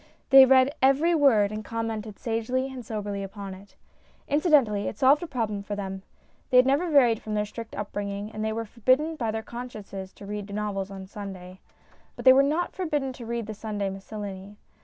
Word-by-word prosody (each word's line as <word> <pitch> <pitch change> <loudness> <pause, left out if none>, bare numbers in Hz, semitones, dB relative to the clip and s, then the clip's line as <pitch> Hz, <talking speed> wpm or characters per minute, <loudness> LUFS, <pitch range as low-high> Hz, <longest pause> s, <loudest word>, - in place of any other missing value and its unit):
They 270 -1 +10
read 265 +1 +5
every 275 +6 +4
word 240 -10 +4
and 215 0 -5
commented 225 -2 -4
sagely 250 +3 -2
and 255 -2 -7
soberly 205 -3 -4
upon 195 0 -7
it. 195 +2 -15 0.5
Incidentally, 280 - +3
it - - -5
solved 275 +4 +5
a 345 - -4
problem 220 -7 -2
for 205 +1 -5
them. 195 -1 -5 0.5
They 250 - +4
had 250 - +7
never 285 +7 +2
varied 245 -7 +4
from 215 -1 -4
their 210 0 0
strict 225 +2 -9
upbring 205 0 -4
ing, 200 +2 -5
and 215 0 -5
they 220 - 0
were 225 +1 -3
forbidden 255 +9 +1
by 235 -7 -2
their 220 0 -3
consciences 210 -6 -8
to 200 - -12
read 205 0 -6
novels 200 -2 -3
on 195 -1 -8
Sunday. 190 -2 -9 0.6
But - - -9
they 260 - +10
were 270 - +6
not 305 +5 0
forbidden 295 -7 -2
to 240 -2 -10
read 235 -1 -3
The 215 - -6
Sunday 205 -2 -3
Miscellany. 200 0 -8
220 Hz, 200 wpm, -26 LUFS, 205-260 Hz, 0.6 s, They